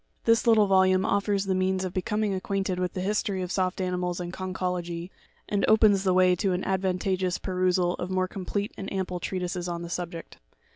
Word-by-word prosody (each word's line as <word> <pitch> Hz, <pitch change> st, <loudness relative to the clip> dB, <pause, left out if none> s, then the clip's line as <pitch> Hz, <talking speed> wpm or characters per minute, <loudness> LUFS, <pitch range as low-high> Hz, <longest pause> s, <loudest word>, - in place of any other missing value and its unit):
This 230 Hz, +1 st, +3 dB
little 220 Hz, -2 st, +6 dB
volume 190 Hz, -1 st, +4 dB
offers 200 Hz, 0 st, +1 dB
the 195 Hz, -, 0 dB
means 185 Hz, 0 st, 0 dB
of 180 Hz, -, -5 dB
becoming 210 Hz, +2 st, -1 dB
acquainted 190 Hz, -1 st, -2 dB
with 180 Hz, -1 st, -1 dB
the 185 Hz, -, -3 dB
history 200 Hz, -1 st, -1 dB
of 180 Hz, -, -5 dB
soft 185 Hz, 0 st, 0 dB
animals 180 Hz, -1 st, -1 dB
and 175 Hz, 0 st, -5 dB
conchology, 180 Hz, -2 st, -3 dB, 0.4 s
and 200 Hz, -1 st, 0 dB
opens 215 Hz, -3 st, +5 dB
the 185 Hz, -2 st, +2 dB
way 185 Hz, -1 st, +5 dB
to 195 Hz, 0 st, +1 dB
an 180 Hz, -, -2 dB
advantageous 185 Hz, -1 st, 0 dB
perusal 180 Hz, -1 st, +1 dB
of 180 Hz, -, -3 dB
more 185 Hz, 0 st, 0 dB
complete 200 Hz, +2 st, -3 dB
and 195 Hz, -, -5 dB
ample 185 Hz, -2 st, -2 dB
treatises 180 Hz, 0 st, -3 dB
on 170 Hz, -1 st, -4 dB
the 170 Hz, -, -6 dB
subject. 170 Hz, -1 st, -5 dB
185 Hz, 190 wpm, -27 LUFS, 180-195 Hz, 0.4 s, little